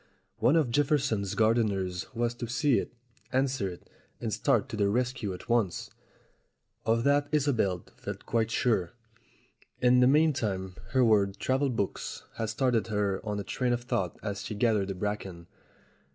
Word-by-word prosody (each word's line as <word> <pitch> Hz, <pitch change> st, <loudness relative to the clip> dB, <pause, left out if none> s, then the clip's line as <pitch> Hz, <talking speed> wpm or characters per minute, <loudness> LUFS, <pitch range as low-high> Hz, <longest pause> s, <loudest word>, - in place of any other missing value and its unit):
One 135 Hz, -, +4 dB
of 150 Hz, -7 st, +2 dB
Jefferson's 135 Hz, -8 st, +1 dB
gardeners 100 Hz, -5 st, +1 dB
was 120 Hz, 0 st, 0 dB
to 120 Hz, 0 st, -6 dB
see 125 Hz, +2 st, +2 dB
it, -, -, -5 dB, 0.4 s
answer 130 Hz, -6 st, +1 dB
it, 90 Hz, -, -11 dB, 0.3 s
and 110 Hz, -3 st, -3 dB
start 110 Hz, +5 st, +2 dB
to 115 Hz, -, -4 dB
the 100 Hz, -2 st, +2 dB
rescue 125 Hz, -1 st, -1 dB
at 90 Hz, -, -8 dB
once. 115 Hz, -7 st, 0 dB, 1.0 s
Of 115 Hz, +1 st, +3 dB
that 145 Hz, +1 st, +3 dB
Isobel 120 Hz, -, +1 dB
felt -, -, -7 dB
quite 115 Hz, -1 st, +1 dB
sure. 105 Hz, -7 st, +1 dB, 0.9 s
In 125 Hz, 0 st, +5 dB
the 125 Hz, -, +6 dB
meantime, 120 Hz, -, +2 dB, 0.2 s
her 130 Hz, -2 st, +5 dB
word 100 Hz, -3 st, +3 dB
"travel 135 Hz, +2 st, +1 dB
books" 105 Hz, -6 st, -3 dB
had 110 Hz, -1 st, -2 dB
started 115 Hz, 0 st, +1 dB
her 105 Hz, -2 st, -1 dB
on 105 Hz, -2 st, -3 dB
a -, -, -3 dB
train 120 Hz, +6 st, -1 dB
of 120 Hz, 0 st, -2 dB
thought 95 Hz, -7 st, -2 dB
as 100 Hz, -2 st, -3 dB
she 110 Hz, -, -5 dB
gathered 105 Hz, -3 st, +2 dB
the 95 Hz, -, -4 dB
bracken. 95 Hz, -3 st, -4 dB
115 Hz, 160 wpm, -29 LUFS, 100-125 Hz, 1.0 s, the